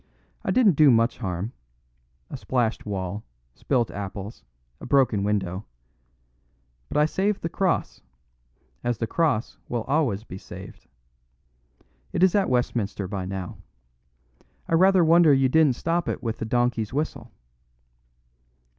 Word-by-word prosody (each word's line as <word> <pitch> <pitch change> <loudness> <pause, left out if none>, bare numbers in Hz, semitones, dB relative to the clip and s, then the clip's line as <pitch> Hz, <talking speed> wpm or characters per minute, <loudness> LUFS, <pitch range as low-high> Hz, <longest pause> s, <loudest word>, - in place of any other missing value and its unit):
I - - -3
didn't 200 - +4
do 150 -2 +7
much 115 -1 +3
harm 95 +1 -3 0.8
a - - -4
splashed 120 -4 -1
wall, 95 0 -4 0.3
spilt 120 - 0
apples, 100 - -7 0.4
a - - -9
broken 125 -7 +3
window; 100 -2 -1 1.2
but - - -2
I 150 - +5
saved 195 +5 -1
the 165 - -1
cross, 185 +1 -1 0.8
as 120 -2 0
the 115 - -1
cross 135 -4 0
will 120 -2 -2
always 135 -8 0
be 95 -4 -9
saved. - - -11 1.3
It - - +1
is 185 - +5
at 200 -2 +2
Westminster 115 -5 -1
by 95 -1 -4
now. 95 -1 -6 1.1
I - - -3
rather 185 +1 +5
wonder 165 -2 +6
you 135 -1 +3
didn't 150 -2 +4
stop 170 +5 -1
it - - -4
with 115 -1 -3
the - - -3
Donkey's 120 -2 0
Whistle." 150 +4 -3
120 Hz, 135 wpm, -25 LUFS, 105-155 Hz, 1.3 s, do